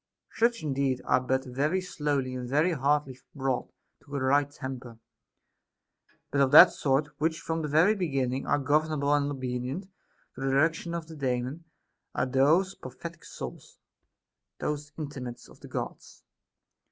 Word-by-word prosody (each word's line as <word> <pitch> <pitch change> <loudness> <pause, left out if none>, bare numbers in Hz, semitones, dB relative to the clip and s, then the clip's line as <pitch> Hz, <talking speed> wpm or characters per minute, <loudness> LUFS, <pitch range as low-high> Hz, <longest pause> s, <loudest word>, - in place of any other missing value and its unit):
Such 230 -2 +2
indeed 135 -3 0
are 125 - +3
but 130 +1 0
very 145 +8 0
slowly 145 -7 -2
and 125 -1 -5
very 150 +6 +3
hardly 140 -3 0 0.2
brought 135 -3 -1 0.3
to 145 0 -9
a - - 0
right 140 +2 +3
temper; 130 -4 -7 1.3
but 140 - +2
of 135 - +4
that 170 +6 +10
sort 140 +1 +1
which 160 +1 0
from 160 0 -2
the 150 - -2
very 160 +8 +5
begin 140 - 0
ning 130 +1 -3
are - - +3
governable 145 0 +1
and 145 -1 +2
obedient 130 +4 -3 0.5
to 130 - -10
the 135 - 0
direction 165 +5 +1
of 170 -2 -4
the 160 0 -11
Daemon, 130 +3 -2 0.5
are - - +1
those 150 +9 +3
prophetic 165 +6 -9
sonls, - - -9 0.8
those 150 0 -3
intimates 135 -6 -6
of - - -17
the - - -11
Gods. - - -6
140 Hz, 155 wpm, -28 LUFS, 130-155 Hz, 1.3 s, that